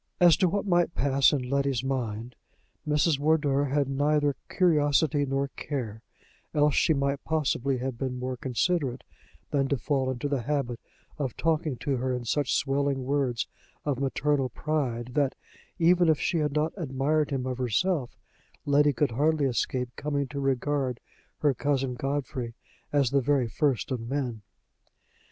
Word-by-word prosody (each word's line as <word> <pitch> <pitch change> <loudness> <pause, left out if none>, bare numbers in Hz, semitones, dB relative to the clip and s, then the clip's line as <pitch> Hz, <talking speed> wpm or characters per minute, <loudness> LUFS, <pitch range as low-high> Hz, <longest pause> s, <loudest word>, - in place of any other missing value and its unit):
As 175 -3 +7
to 185 -2 +3
what 205 +3 -1
might 175 -2 +2
pass 135 0 +4
in 130 -4 -1
Letty's 140 -2 0
mind, 120 -3 -3 0.5
Mrs. 150 0 +2
Wardour 145 -2 +2
had 140 0 +1
neither 145 +1 +1
curiosity 150 -4 +2
nor 135 +1 -1
care: 120 -7 -5 0.5
else 150 -1 +4
she - - +3
might 140 0 -1
possibly 140 -4 0
have 125 -1 -4
been 130 -2 -2
more 125 +1 -3
considerate 130 +1 -1 0.5
than 140 -2 +2
to 140 - 0
fall 135 +1 0
into 130 +2 -2
the 140 -3 -1
habit 125 -2 -2 0.4
of 135 -4 -3
talking 155 -3 0
to 140 -2 0
her 130 +1 -1
in 125 -1 -5
such 140 +3 0
swelling 140 -1 0
words 130 -4 0 0.4
of 140 -4 -1
maternal 135 0 0
pride 125 -4 -2
that, 140 -1 +1 0.4
even 175 0 +4
if 155 - +3
she 170 - 0
had 150 -2 0
not 155 +2 0
admired 150 -1 0
him 135 -2 -2
of 130 -1 -3
herself, 130 - 0 0.5
Letty 145 0 +4
could 135 +1 +1
hardly 150 +4 +2
escape 125 0 -1
coming 145 -1 -2
to 140 - -5
regard 135 -1 0 0.4
her 145 -2 +3
cousin 135 0 0
Godfrey 130 -2 -3 0.4
as 140 -4 +2
the 140 0 +3
very 135 -2 +2
first 130 -2 0
of 130 - -1
men. 120 -1 -3
140 Hz, 155 wpm, -27 LUFS, 130-150 Hz, 0.5 s, As